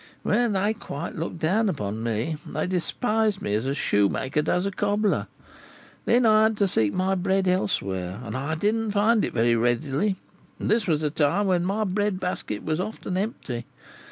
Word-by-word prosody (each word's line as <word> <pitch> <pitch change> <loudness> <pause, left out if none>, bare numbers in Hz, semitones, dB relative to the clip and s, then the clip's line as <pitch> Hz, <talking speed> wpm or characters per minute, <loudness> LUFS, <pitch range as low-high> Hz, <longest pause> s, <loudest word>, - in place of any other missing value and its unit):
Well, 240 -1 +2
they 205 +1 +1
quite 145 -10 -6
looked 165 +2 -4
down 195 +7 +2
upon 110 - -3
me; 115 +7 -1
they - - -3
despised 210 +3 0
me 100 - -2
as 110 +5 0
a 135 - 0
shoemaker 130 +7 +1
does 180 +4 0
a 200 - -1
cobbler. 205 +1 0 0.8
Then 240 0 +4
I 215 -1 +6
had 220 0 +3
to 200 - +3
seek 110 - +1
my 185 - 0
bread 190 +1 +1
elsewhere, 95 - -1
and 110 -2 -6
I 140 +5 -2
didn't 215 +6 0
find 210 +2 +3
it - - -1
very 115 0 +3
readily; 135 - +1 0.4
and - - -2
this 220 -2 +2
was 155 -3 +2
the 150 -2 0
time 160 +7 +2
when 180 -2 +2
my 205 +3 0
bread 205 0 0
basket 180 - -3
was 155 +1 0
so 185 - 0
often 205 -3 -6
empty. 165 - -3
185 Hz, 185 wpm, -25 LUFS, 135-205 Hz, 0.8 s, I